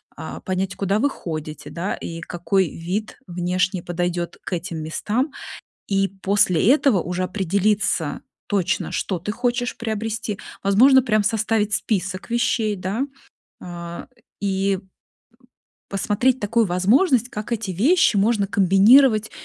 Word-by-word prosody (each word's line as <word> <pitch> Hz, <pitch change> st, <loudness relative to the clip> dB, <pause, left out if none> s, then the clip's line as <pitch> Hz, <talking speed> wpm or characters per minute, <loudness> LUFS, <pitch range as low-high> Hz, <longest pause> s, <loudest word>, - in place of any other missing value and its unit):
а, -, -, -7 dB
понять, 185 Hz, 0 st, -2 dB
куда 200 Hz, +2 st, 0 dB
вы 285 Hz, -, +2 dB
ходите, 155 Hz, -, -6 dB
да, 175 Hz, +4 st, -3 dB
и 165 Hz, 0 st, -7 dB
какой 180 Hz, +2 st, 0 dB
вид 190 Hz, +6 st, -4 dB
внешний 180 Hz, +1 st, -1 dB
подойдет 175 Hz, 0 st, -3 dB
к -, -, -5 dB
этим 170 Hz, -1 st, -4 dB
местам? 225 Hz, -, -1 dB, 0.6 s
И 195 Hz, 0 st, +2 dB
после 195 Hz, -1 st, +2 dB
этого 275 Hz, -9 st, +3 dB
уже 180 Hz, +1 st, -2 dB
определиться 195 Hz, -3 st, 0 dB, 0.3 s
точно, 195 Hz, -4 st, -1 dB
что 185 Hz, -3 st, -2 dB
ты 210 Hz, +5 st, -4 dB
хочешь 245 Hz, +1 st, -1 dB
приобрести. 220 Hz, -1 st, -3 dB, 0.2 s
Возможно, 255 Hz, +7 st, +6 dB
прям 215 Hz, -4 st, +2 dB
составить 215 Hz, -1 st, +1 dB
список 190 Hz, -1 st, -2 dB
вещей, 230 Hz, -2 st, +1 dB
да, 190 Hz, +6 st, -2 dB, 0.6 s
а, 170 Hz, +1 st, -7 dB, 0.3 s
и 195 Hz, -1 st, 0 dB, 1.1 s
посмотреть 220 Hz, +6 st, +1 dB
такую 230 Hz, +2 st, +2 dB
возможность, 230 Hz, -, +3 dB
как 215 Hz, 0 st, -6 dB
эти 220 Hz, -4 st, -2 dB
вещи 260 Hz, -, +3 dB
можно 205 Hz, 0 st, +2 dB
комбинировать 215 Hz, +5 st, +5 dB
200 Hz, 125 wpm, -22 LUFS, 180-225 Hz, 1.1 s, Возможно